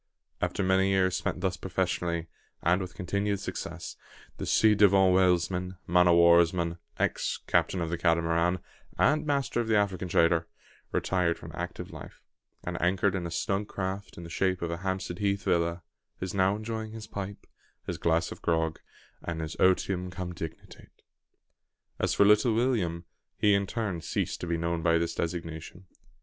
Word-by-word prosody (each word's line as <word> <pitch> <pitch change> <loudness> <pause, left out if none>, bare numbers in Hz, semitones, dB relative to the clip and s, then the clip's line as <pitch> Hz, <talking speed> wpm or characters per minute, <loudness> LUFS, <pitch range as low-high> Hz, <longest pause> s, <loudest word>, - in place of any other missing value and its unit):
After 95 - 0
many 95 +1 +3
years 95 -1 +2
spent 90 - -2
thus 95 -1 0
professionally, 85 -2 -1 0.4
and 90 +3 +3
with 90 -1 -6
continued 100 +2 -1
success, 100 - -6 0.4
the - - -5
ci 110 -1 +5
devant 95 -2 +5
whalesman, 90 0 +2
man 90 +1 +4
o' 85 - +6
war's 85 0 +6
man, 85 -1 -2 0.2
ex - - 0
captain 90 - +1
of 80 -1 -2
the 85 - -2
Catamaran, 85 +1 +2 0.4
and 155 0 +3
master 140 -4 0
of 115 - -4
the 110 - +3
African 95 -3 0
trader, 85 -1 +3 0.4
retired 90 -3 +1
from - - -10
active - - -6
life; - - -11 0.4
and, - - -4
anchored 95 +2 +2
in 90 -3 -2
a - - -6
snug 95 +5 -1
craft 95 +1 -5
in 85 - -7
the 85 - -8
shape 95 0 0
of 85 - -2
a 85 - -3
Hampstead 95 -1 -3
Heath 100 -1 0
villa, 85 -1 0 0.4
is 95 -1 -4
now 95 0 +3
enjoying 110 0 -5
his 110 -1 -7
pipe, 100 -1 -7 0.4
his - - -4
glass 85 0 +1
of - - -9
grog, 80 -1 0 0.4
and 85 -2 -4
his 80 0 -4
otium 95 0 +2
cum 90 -1 -5
dignitate. 80 -1 -9 1.1
As - - +1
for 100 - +5
"Little 105 +2 +5
William," 100 -9 0 0.3
he 105 -1 +4
in 100 0 +2
turn 100 -7 -3
ceased 80 - -2
to 90 - -4
be 85 0 0
known 85 0 -1
by 85 0 +3
this 85 0 -1
designation. 85 +1 -5
90 Hz, 170 wpm, -28 LUFS, 85-100 Hz, 1.1 s, o